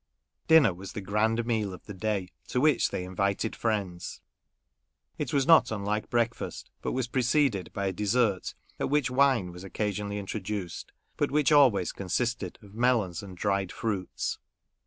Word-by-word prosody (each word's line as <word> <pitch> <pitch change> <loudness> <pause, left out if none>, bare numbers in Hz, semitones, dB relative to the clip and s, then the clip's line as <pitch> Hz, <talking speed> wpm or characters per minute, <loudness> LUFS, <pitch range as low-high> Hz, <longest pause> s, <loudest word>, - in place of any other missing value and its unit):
Dinner 160 - +6
was 95 +2 -9
the 115 - -4
grand 110 +4 +1
meal 110 -5 -1
of - - -17
the 105 - -7
da}', 100 0 -1 0.2
to 125 - 0
which 150 +2 +3
they 90 - -3
invited 100 +4 -1
friends. 100 -6 -2 1.0
It - - -2
was 140 -2 +2
not 160 -6 +6
unlike 105 0 -2
breakfast, 115 -1 -2
but - - -2
was 130 -2 -1
preceded 125 - +1
by 100 - -3
a 95 - 0
dessert, 105 0 +1 0.2
at - - -1
which 145 -3 +1
wine 130 -8 +3
was 90 +1 -10
occasionally 105 +1 -3
introduced, 100 -2 -5 0.3
but - - +1
which 150 +1 +2
always 130 - +5
consisted 100 0 -2
of 100 -1 -15
melons 110 -7 +1
and 95 -3 -10
dried 100 -1 0
fruits. 100 -5 -3
105 Hz, 155 wpm, -28 LUFS, 95-125 Hz, 1.0 s, Dinner